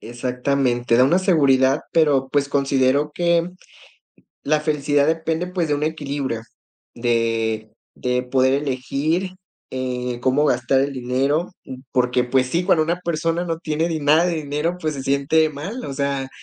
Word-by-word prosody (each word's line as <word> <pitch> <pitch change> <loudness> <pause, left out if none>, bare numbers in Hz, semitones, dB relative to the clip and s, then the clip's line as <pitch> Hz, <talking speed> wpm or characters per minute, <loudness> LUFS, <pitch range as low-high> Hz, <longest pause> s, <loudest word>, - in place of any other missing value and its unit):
Exactamente, 125 0 0
da 125 - +6
una 170 +7 +3
seguridad, 140 -6 +3
pero, 145 -5 +3
pues, 140 +1 0
considero 140 +1 +1
que 170 0 +1 1.0
la 155 +1 +2
felicidad 145 -1 +1
depende, 160 +2 -1
pues, 180 -2 -2
de 145 - +2
un 145 - -2
equilibrio, 145 -6 -3 0.5
de 115 -2 -1 0.2
de 125 0 -1
poder 130 +1 +2
elegir, 145 +6 -1 0.3
eh, 125 -1 -3
cómo 130 +4 +2
gastar 125 0 +2
el 140 +1 -1
dinero, 135 +6 -1 0.4
porque, 125 -1 +1
pues, 130 +1 +1
sí, 170 +7 0
cuando 175 -4 +3
una 175 +2 -2
persona 165 0 -1
no 165 -1 -3
tiene 160 0 -1
di 160 -2 -2
nada 150 +4 +4
de 175 -2 0
dinero, 150 +3 -2
pues, 155 -3 -2
se 135 - -6
siente 140 +3 +2
mal, 190 - -6
o 140 - -5
sea, 140 -1 -2
140 Hz, 155 wpm, -21 LUFS, 130-160 Hz, 1.0 s, da